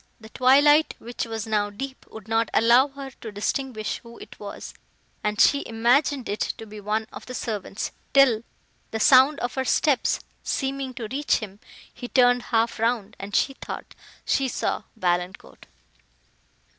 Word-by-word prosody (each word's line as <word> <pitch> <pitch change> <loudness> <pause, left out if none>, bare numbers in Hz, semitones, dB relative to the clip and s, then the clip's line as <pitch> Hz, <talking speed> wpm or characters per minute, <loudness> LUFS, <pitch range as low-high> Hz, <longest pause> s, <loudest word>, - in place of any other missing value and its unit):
The 220 -1 -13
twilight, 290 +6 +5
which 240 +1 -5
was 225 -1 -4
now 210 -2 0
deep, 260 +6 -8
would 220 -1 -11
not 225 0 +1
allow 240 +4 +6
her 275 -1 -9
to 220 - -6
distinguish 215 +2 -3
who 235 0 -13
it - - -13
was, 205 -1 -8 0.5
and 210 0 -1
she 285 0 +5
imagined 245 +4 +2
it 205 - -3 0.2
to 225 - -8
be 215 -1 -10
one 215 +2 -1
of - - -10
the 250 - -6
servants, 210 -3 -4 0.2
till, 265 -6 +5 0.5
the 220 - -4
sound 265 +5 +6
of 245 - -2
her 265 -2 -1
steps 280 +1 +2 0.2
seeming 270 -2 -3
to 230 -3 -5
reach 285 +2 +1
him, 205 -2 -6 0.3
he 245 - -7
turned 245 -1 +4
half 230 -1 +1
round, 225 -2 0
and 200 0 -6
she 270 - +2
thought - - -8 0.3
she 270 - +1
saw 245 - -2
Valancourt! 180 - -3
235 Hz, 160 wpm, -25 LUFS, 215-265 Hz, 0.5 s, allow